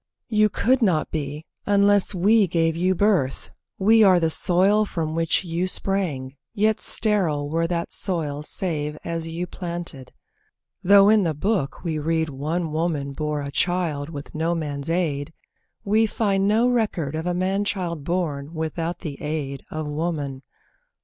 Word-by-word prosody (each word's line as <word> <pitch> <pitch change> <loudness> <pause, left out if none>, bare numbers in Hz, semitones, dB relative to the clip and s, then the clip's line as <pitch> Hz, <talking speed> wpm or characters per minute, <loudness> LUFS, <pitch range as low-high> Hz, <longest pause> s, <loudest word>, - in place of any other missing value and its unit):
You 215 -1 +3
could 255 +5 +1
not 180 -8 +1
be, 150 0 -4 0.2
Unless 200 0 +3
we 205 +3 +4
gave 165 -1 +1
you 185 +2 +1
birth; 185 -10 +1 0.3
we 220 +3 +5
are 190 -4 +6
the 165 -1 +1
soil 195 +5 +4
From 165 -6 -3
which 165 +2 +1
you 170 +2 -1
sprang, 165 -10 -1 0.2
yet 215 0 +2
sterile 175 -10 +2
were 165 +1 +1
that 170 -1 -3
soil 155 -7 -1
Save 150 -2 -2
as 165 -1 -4
you 165 +2 -4
planted. 170 -7 -7 0.7
(Though 200 +2 +6
in 215 -1 +5
the 165 -5 -1
Book 180 -4 -1
we 160 -3 -2
read 160 +1 0
One 155 +4 -3
woman 155 -3 -2
bore 150 0 -2
a 140 - -5
child 165 -3 -1
with 145 -3 -8
no 165 +2 0
man's 145 -2 -4
aid, 160 -4 -1 0.5
We 220 +2 +3
find 200 -3 0
no 225 +4 +3
record 210 - 0
of 160 +2 -3
a 175 - 0
man 190 +3 0
child 175 -6 -3
born 155 -3 -3
Without 165 +2 -3
the 150 -5 -7
aid 145 -3 -4
of 155 0 -4
woman! 150 -3 -3
170 Hz, 155 wpm, -23 LUFS, 150-195 Hz, 0.7 s, are